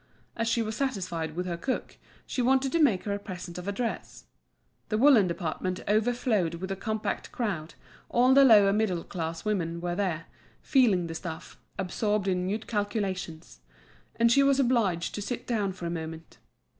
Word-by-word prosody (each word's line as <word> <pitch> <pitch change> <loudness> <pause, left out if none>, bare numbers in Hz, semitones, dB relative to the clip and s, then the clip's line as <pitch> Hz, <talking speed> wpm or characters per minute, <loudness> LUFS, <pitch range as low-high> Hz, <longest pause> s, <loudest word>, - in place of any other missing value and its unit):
As 230 - -1
she 230 0 +2
was 220 0 -4
satisfied 185 - -2
with 180 +1 -2
her 175 -2 -3
cook, 255 +9 -3 0.3
she 255 - -2
wanted 265 +2 +2
to 335 - +2
make 230 -11 +3
her 205 - -2
a 200 - -3
present 180 -3 -7
of 180 - -8
a - - 0
dress. 230 +3 -4 0.7
The 215 - +1
woollen 240 -6 +6
department 180 +1 -3
overflowed 215 -5 +1
with 190 +3 -5
a - - -1
compact 215 +2 -3
crowd, 180 -10 -3 0.3
all 250 +2 +4
the 275 +1 +7
lower 205 -6 +7
middle 200 -5 0
class 165 -1 -5
women 170 -5 -1
were 175 0 -2
there, 175 -4 -1 0.4
feeling 225 - +3
the 165 - -5
stuff, 165 -1 -7 0.2
absorbed 200 +2 -1
in 180 -1 0
mute 210 +3 -2
calculations; 195 - -3 0.6
and 235 0 +3
she 275 - +5
was 275 0 +4
obliged 225 -10 +1
to 205 - -4
sit 240 +4 -4
down 210 -5 0
for 180 -2 -8
a 170 - -2
moment. 160 -1 -7
200 Hz, 180 wpm, -28 LUFS, 175-230 Hz, 0.7 s, the